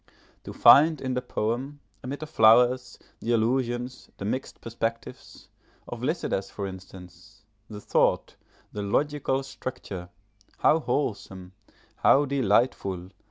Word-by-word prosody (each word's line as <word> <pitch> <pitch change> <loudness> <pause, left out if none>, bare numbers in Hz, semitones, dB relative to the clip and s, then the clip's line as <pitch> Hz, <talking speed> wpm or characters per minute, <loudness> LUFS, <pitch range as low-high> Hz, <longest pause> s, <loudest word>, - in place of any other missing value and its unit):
To - - -7
find 155 +1 +6
in 130 -1 -3
the 125 - -1
poem, 125 +8 -3 0.2
amid 135 +4 -6
the - - -4
flowers, 125 0 +4 0.2
the 120 - -1
allusions, 120 +2 -1
the 100 - -6
mixed 130 +6 -4
perspectives, 115 0 -6 0.4
of - - -7
Lycidas 95 0 -2
for 100 - -5
instance, 95 +1 -12 0.3
the 105 -2 -8
thought, - - +1 0.4
the 105 - -4
logical 135 +5 0
structure: 100 -9 -7 0.5
how 160 - +3
wholesome! 95 - -3 0.4
how 145 +2 +4
delightful! 105 -8 0
120 Hz, 115 wpm, -26 LUFS, 100-130 Hz, 0.5 s, find